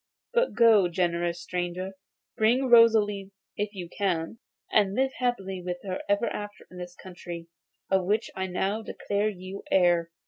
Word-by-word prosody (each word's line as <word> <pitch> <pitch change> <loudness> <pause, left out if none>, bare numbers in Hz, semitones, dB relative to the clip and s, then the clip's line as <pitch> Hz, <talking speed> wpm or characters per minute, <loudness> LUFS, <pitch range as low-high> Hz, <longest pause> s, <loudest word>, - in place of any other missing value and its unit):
But - - +2
go, 225 -5 +6
generous 175 -1 0
stranger; 180 +1 -3 0.4
bring 230 +4 +3
back 260 -2 -1
Rosalie 215 -4 +5 0.3
if 205 0 -3
you 180 -2 -5
can, 180 +1 -2 0.3
and 200 -2 +3
live 265 +2 +2
happy 195 -7 -1
with 180 0 -3
her 185 -2 -4
ever 205 +3 +2
after 205 -2 -5
in 180 - -10
this 180 0 -8
country, 175 -2 -9 0.4
of 190 -1 +3
which 210 +4 0
I 190 0 -2
now 195 +4 -1
declare 205 -1 -1
you 190 0 -8
heir. 175 -3 +3
195 Hz, 160 wpm, -27 LUFS, 180-215 Hz, 0.4 s, go